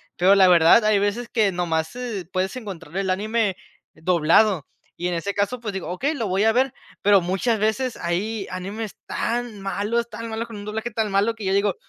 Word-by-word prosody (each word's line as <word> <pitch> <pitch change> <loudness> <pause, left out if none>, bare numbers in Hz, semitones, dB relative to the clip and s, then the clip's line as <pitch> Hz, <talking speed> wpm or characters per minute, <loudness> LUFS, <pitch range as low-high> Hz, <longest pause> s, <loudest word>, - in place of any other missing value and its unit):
pero 185 +3 +5
la 195 -2 +6
verdad, 175 +5 +6
hay 215 -1 +4
veces 205 +4 -1
que 215 -5 +2
nomás, 165 +1 -2
eh, 235 -7 -4
puedes 185 +4 -1
encontrar 190 -8 -7
el 195 -1 0
anime 210 0 0 0.4
doblado 170 +1 +3 0.3
y 175 - -2
en 175 - -1
ese 200 +4 -2
caso, 205 +5 -1
pues 215 -4 -5
digo: 190 - -5
"Okey, 275 - -1
lo 230 -8 -2
voy 190 +3 +1
a 225 - +5
ver", 255 +2 +1 0.3
pero 200 -2 +5
muchas 195 +6 0
veces 225 +4 0
hay 195 +5 -2
animes 200 +4 -5
tan 235 -3 -2
malos, 210 +4 -1
tan 230 +1 -7
malos, 225 +1 -3
con 225 -3 -9
un 205 - -8
doblaje 220 +3 -4
tan 215 -1 -1
malo 200 +4 +2
que 220 -2 -10
yo 190 0 0
digo: 200 -1 +2
205 Hz, 205 wpm, -23 LUFS, 185-225 Hz, 0.4 s, la